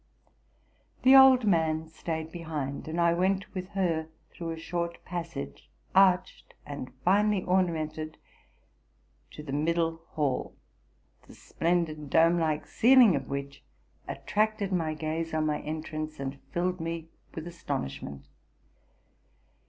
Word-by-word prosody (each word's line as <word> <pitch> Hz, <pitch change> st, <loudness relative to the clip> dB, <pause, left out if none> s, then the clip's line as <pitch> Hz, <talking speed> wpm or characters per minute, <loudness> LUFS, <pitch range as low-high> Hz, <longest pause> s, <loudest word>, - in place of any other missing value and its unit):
'The 260 Hz, +1 st, +8 dB
old 265 Hz, -3 st, +8 dB
man 160 Hz, -4 st, +2 dB
staid 160 Hz, 0 st, -5 dB
behind; 155 Hz, -5 st, -5 dB
and 160 Hz, +2 st, -3 dB
I 170 Hz, 0 st, +4 dB
went 190 Hz, +2 st, 0 dB
with 185 Hz, -1 st, -4 dB
her 165 Hz, -4 st, 0 dB, 0.2 s
through 170 Hz, -1 st, -6 dB
a 165 Hz, -, -4 dB
short 170 Hz, +1 st, -4 dB
passage, 165 Hz, -, -6 dB, 0.2 s
arched 190 Hz, -1 st, +3 dB
and 140 Hz, -3 st, -6 dB
finely 205 Hz, +1 st, +3 dB
ornamented, 160 Hz, -4 st, -1 dB, 1.1 s
to 150 Hz, -, -10 dB
the 145 Hz, -, -7 dB
mid 155 Hz, +4 st, +1 dB
dle 165 Hz, -1 st, -1 dB
hall, 145 Hz, -4 st, -1 dB, 0.7 s
the -, -, -14 dB
splendid, 165 Hz, -4 st, -1 dB
dome 165 Hz, +3 st, +4 dB
like 155 Hz, -2 st, 0 dB
ceiling 245 Hz, -, +6 dB
of 135 Hz, -2 st, -4 dB
which 140 Hz, 0 st, -5 dB, 0.4 s
attracted 215 Hz, -2 st, -1 dB
my 160 Hz, -3 st, 0 dB
gaze 160 Hz, +1 st, -3 dB
on 155 Hz, 0 st, +1 dB
my 150 Hz, -1 st, 0 dB
entrance, 155 Hz, 0 st, -5 dB
and 135 Hz, 0 st, -5 dB
filled 180 Hz, +1 st, -1 dB
me 165 Hz, 0 st, -4 dB, 0.3 s
with 160 Hz, -, -5 dB
astonishment. 130 Hz, -, -5 dB
165 Hz, 125 wpm, -29 LUFS, 155-180 Hz, 1.1 s, The